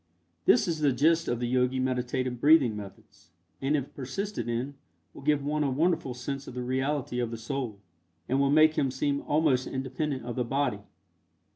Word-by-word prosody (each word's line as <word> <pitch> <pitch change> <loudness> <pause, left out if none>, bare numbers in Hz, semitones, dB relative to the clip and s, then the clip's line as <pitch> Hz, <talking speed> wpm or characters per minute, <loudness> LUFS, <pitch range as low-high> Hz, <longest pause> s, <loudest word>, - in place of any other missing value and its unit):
This - - +5
is 165 -2 -1
the 145 -2 +3
gist 160 +6 +3
of 120 - -1
the 120 - -1
Yogi 125 +1 +1
meditative 130 -1 -1
breathing 145 -7 +5
methods, 100 -4 -11 0.3
and 140 +3 +2
if 140 -1 -5
persisted 170 - -4
in 120 +4 -2 0.4
will - - -11
give 145 0 +1
one 150 +1 0
a 140 - +1
wonderful 140 -2 0
sense 135 +2 -5
of 125 - -8
the 125 - -3
reality 130 0 -1
of 120 -2 -1
the 115 - -5
Soul, 115 -2 -4 0.5
and 135 +2 +1
will 140 0 +3
make 155 +2 +5
him 135 - +2
seem 140 +2 -1
almost 145 -4 +2
independent 130 0 -3
of 120 -1 -4
the 125 - 0
body. 130 -3 0
130 Hz, 185 wpm, -28 LUFS, 125-145 Hz, 0.5 s, This